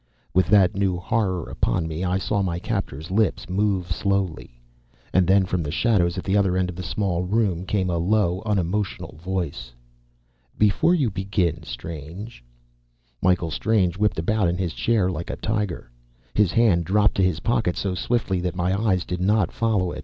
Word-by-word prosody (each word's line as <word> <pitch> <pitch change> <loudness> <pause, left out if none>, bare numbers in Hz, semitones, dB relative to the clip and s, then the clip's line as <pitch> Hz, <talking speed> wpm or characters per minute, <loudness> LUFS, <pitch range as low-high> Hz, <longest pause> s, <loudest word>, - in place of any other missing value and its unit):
With 90 -1 +3
that 100 -4 +5
new 95 -2 0
horror 95 -2 -1
upon 80 - -1
me, 80 +2 -4
I 90 0 +1
saw 100 +1 -1
my 90 -3 -1
captor's 90 - -4
lips 105 +1 +1
move 95 -1 0
slowly.... 95 -10 -2 0.5
And 90 -2 +4
then, 95 0 +4
from 90 -1 -1
the 75 - -3
shadows 85 -1 +1
at 90 - -3
the 95 - 0
other 95 -3 +2
end 90 -1 0
of - - -11
the 90 - -5
small 90 +1 -1
room, 95 -2 0
came 95 -3 0
a 85 - 0
low, 95 0 +1
unemotional 100 -3 -2
voice. 85 -10 -3 0.8
"Before 105 - +3
you 135 -10 +1
begin, 95 -3 -1
Strange 80 - -8 0.4
" - - -42
Michael 90 -3 +2
Strange 100 -4 +1
whipped 105 +2 +1
about 100 +4 +1
in 85 - -1
his 90 -3 -2
chair 110 -5 +1
like 85 0 -5
a - - -3
tiger. 105 - -3 0.4
His 105 -4 +3
hand 100 -6 +3
dropped 105 +4 +3
to 95 - +3
his 90 -5 +1
pocket, 110 -6 +1
so 95 -2 -1
swiftly 95 -1 -1
that 90 0 -2
my 90 +1 0
eyes 95 -5 +1
did 90 0 -4
not 100 -1 +2
follow 105 -6 0
it. - - -6
95 Hz, 185 wpm, -23 LUFS, 85-105 Hz, 0.8 s, that